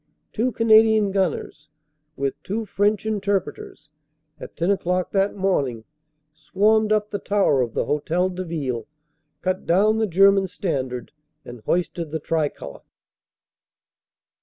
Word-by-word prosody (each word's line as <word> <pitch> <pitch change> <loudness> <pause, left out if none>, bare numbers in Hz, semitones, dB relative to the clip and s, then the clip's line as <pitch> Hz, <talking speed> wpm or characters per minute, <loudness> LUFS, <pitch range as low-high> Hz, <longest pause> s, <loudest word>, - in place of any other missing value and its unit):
Two 240 +3 0
Canadian 220 -2 +4
gunners, 190 -5 -2 0.5
with 135 0 -1
two 220 +3 -3
French 205 +1 0
interpreters, 200 -7 -3 0.5
at - - -11
ten 170 +4 +1
o 200 - +2
clock 180 0 -2
that 195 0 +1
morning 140 - -1 0.5
swarmed 210 +8 +1
up 210 0 +1
the 205 - -3
tower 195 -11 +2
of 120 -3 -3
the - - 0
Hotel 165 +5 0
de 185 0 -5
Ville, 140 -9 -4 0.6
cut 185 0 -2
down 210 +5 +3
the 220 - +1
German 195 +1 +4
standard, 130 -9 -4 0.3
and 120 -2 -10
hoisted 170 -2 -1
the 160 +1 -3
tricolor. 155 -3 -3
185 Hz, 130 wpm, -23 LUFS, 155-205 Hz, 0.6 s, Canadian